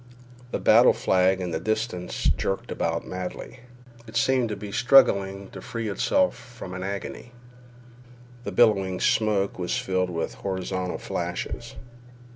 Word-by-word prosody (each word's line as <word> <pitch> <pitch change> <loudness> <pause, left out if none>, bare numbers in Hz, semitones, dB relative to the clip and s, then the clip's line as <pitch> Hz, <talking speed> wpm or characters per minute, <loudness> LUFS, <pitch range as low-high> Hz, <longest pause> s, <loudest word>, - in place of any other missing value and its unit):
The - - -2
battle - - +6
flag 95 0 +2
in 90 -1 -3
the 80 - -2
distance 110 -4 -3
jerked 95 - 0
about - - -2
madly. 90 +7 -6 0.5
It 110 - -4
seemed 130 -3 +2
to 105 - -3
be 105 0 -8
struggling 100 -6 +4
to - - -9
free 115 -2 -4
itself 280 - +2
from 120 -6 -10
an 95 - -5
agony. 100 +5 -6 1.1
The - - -4
billowing 100 -6 +3
smoke 100 -3 +1
was 90 -1 -1
filled 95 -1 0
with 85 -7 -3
horizontal 95 -1 -3
flashes. - - -5
100 Hz, 135 wpm, -25 LUFS, 95-115 Hz, 1.1 s, battle